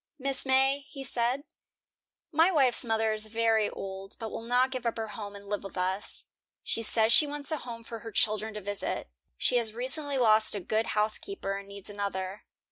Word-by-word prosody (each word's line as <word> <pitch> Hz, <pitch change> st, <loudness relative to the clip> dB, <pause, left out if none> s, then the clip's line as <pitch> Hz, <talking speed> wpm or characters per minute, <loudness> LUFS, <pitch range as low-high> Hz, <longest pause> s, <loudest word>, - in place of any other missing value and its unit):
"Mrs. 270 Hz, 0 st, +4 dB
May," 265 Hz, +1 st, +4 dB
he 280 Hz, -1 st, -10 dB
said, 250 Hz, +2 st, 0 dB, 0.9 s
"my 325 Hz, +4 st, +5 dB
wife's 270 Hz, -8 st, +4 dB
mother 225 Hz, -2 st, +1 dB
is 215 Hz, 0 st, -3 dB
very 225 Hz, -1 st, +2 dB
old, 195 Hz, 0 st, -5 dB
but 225 Hz, -1 st, -5 dB
will -, -, -5 dB
not 250 Hz, +3 st, +2 dB
give 255 Hz, -2 st, -3 dB
up 230 Hz, -, -1 dB
her 220 Hz, -1 st, -3 dB
home 205 Hz, -1 st, -7 dB
and 200 Hz, 0 st, -11 dB
live 205 Hz, 0 st, -3 dB
with 195 Hz, -1 st, -9 dB
us. 185 Hz, +2 st, -2 dB, 0.4 s
She 230 Hz, -, 0 dB
says 220 Hz, 0 st, +3 dB
she 300 Hz, -, +7 dB
wants 290 Hz, +2 st, -3 dB
a 310 Hz, -, 0 dB
home 235 Hz, -4 st, -8 dB
for 230 Hz, 0 st, -7 dB
her 225 Hz, 0 st, -8 dB
children 215 Hz, 0 st, 0 dB
to 210 Hz, -, -5 dB
visit. 200 Hz, -, -4 dB, 0.3 s
She 245 Hz, -, +3 dB
has 225 Hz, -2 st, 0 dB
recently 275 Hz, +3 st, -2 dB
lost 220 Hz, -3 st, +4 dB
a -, -, -1 dB
good 215 Hz, +3 st, -1 dB
housekeeper, 215 Hz, -, -1 dB
and 200 Hz, 0 st, -7 dB
needs 200 Hz, -1 st, -10 dB
another. 200 Hz, -1 st, -4 dB
225 Hz, 200 wpm, -29 LUFS, 205-255 Hz, 0.9 s, she